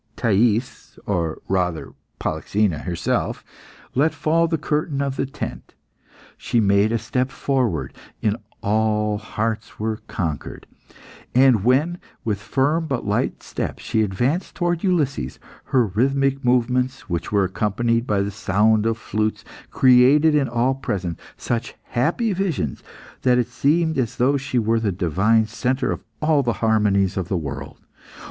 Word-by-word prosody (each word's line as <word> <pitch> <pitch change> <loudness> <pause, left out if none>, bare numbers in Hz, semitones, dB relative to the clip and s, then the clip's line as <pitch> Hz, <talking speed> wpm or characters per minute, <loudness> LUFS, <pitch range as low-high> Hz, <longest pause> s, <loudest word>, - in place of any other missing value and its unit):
Thais 115 +2 0
or 85 -5 -2
rather 90 -4 -1 0.3
Polyxena 100 -7 0
herself 85 -2 -2 0.5
let 155 +5 +2
fall 160 +3 +2
the 165 0 0
curtain 150 -1 -1
of 140 -1 -1
the 135 - -1
tent. 135 - -7 0.6
She 120 +1 0
made 100 0 +3
a 115 - +2
step 125 +4 -1
forward, 130 - -1 0.3
and 105 0 +1 0.3
all 105 0 +1
hearts 110 0 -4
were 110 0 -1
conquered. 80 -5 -4 0.7
And 130 -5 +5
when, 145 +9 +2 0.3
with 105 -3 -1
firm 150 +8 0
but 135 -6 -2
light 100 0 -1
steps, - - -5
she 110 - 0
advanced 120 - -1
towards 175 -2 -1
Ulysses, 145 - 0 0.3
her 125 -3 +3
rhythmic 135 +6 +1
movements, 125 +1 +1
which 85 -3 -3
were 100 -2 +3
accompanied 115 +5 0
by 100 -2 +1
the 100 - -3
sound 105 +2 +2
of 115 0 0
flutes, 110 -1 -2 0.2
created 130 +5 +5
in 145 -3 +2
all 120 +2 +1
present 95 -10 -3 0.2
such 120 -1 -3
happy 175 - +1
visions, 175 - -2 0.4
that 125 -1 +3
it 120 -1 0
seemed 160 +4 +1
as 120 -4 -1
though 130 +4 +3
she 135 -2 -2
were 115 0 +2
the 110 -3 0
divine 95 +6 +2
centre 125 +4 -1
of - - -4 0.2
all 155 -2 +4
the 120 -3 0
harmonies 100 -3 +2
of 95 -3 -2
the 95 - -1
world. 70 -3 -6
115 Hz, 145 wpm, -22 LUFS, 105-135 Hz, 0.7 s, And